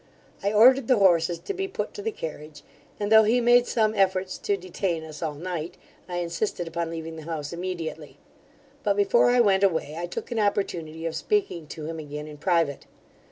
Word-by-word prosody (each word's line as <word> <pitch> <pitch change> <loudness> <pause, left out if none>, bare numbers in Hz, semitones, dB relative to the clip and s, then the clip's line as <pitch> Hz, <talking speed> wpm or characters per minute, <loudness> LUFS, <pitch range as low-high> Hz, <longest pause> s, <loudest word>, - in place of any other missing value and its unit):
I 200 - 0
ordered 245 +4 +6
the 255 - +4
horses 175 -3 +4
to 400 - -5
be 390 0 -3
put 385 - -4
to 415 - -7
the 445 +2 -2
carriage, 155 - -8 0.4
and, 205 0 -2
though 220 0 +9
he 220 +3 +3
made 245 0 +5
some 215 -2 +1
efforts 190 -2 +1
to 200 - 0
detain 180 -2 -3
us 155 -1 -10
all 155 -3 -2
night, 170 +1 -5 0.3
I 175 - -4
insisted 175 +1 -2
upon 165 0 -3
leaving 165 0 -6
the - - -7
house 155 -2 -4
immediately; 175 -2 -5 0.6
but, 200 -1 +1
before 205 +4 +4
I 245 0 +5
went 195 -3 +3
away, 160 -5 +1
I 175 - -3
took 175 - -6
an 235 - -1
opportunity 170 -6 -1
of 165 - -2
speaking 395 - -1
to 155 0 -7
him 165 +1 -5
again 150 0 -6
in 150 -1 -10
private. 165 -4 0
180 Hz, 200 wpm, -26 LUFS, 160-210 Hz, 0.6 s, though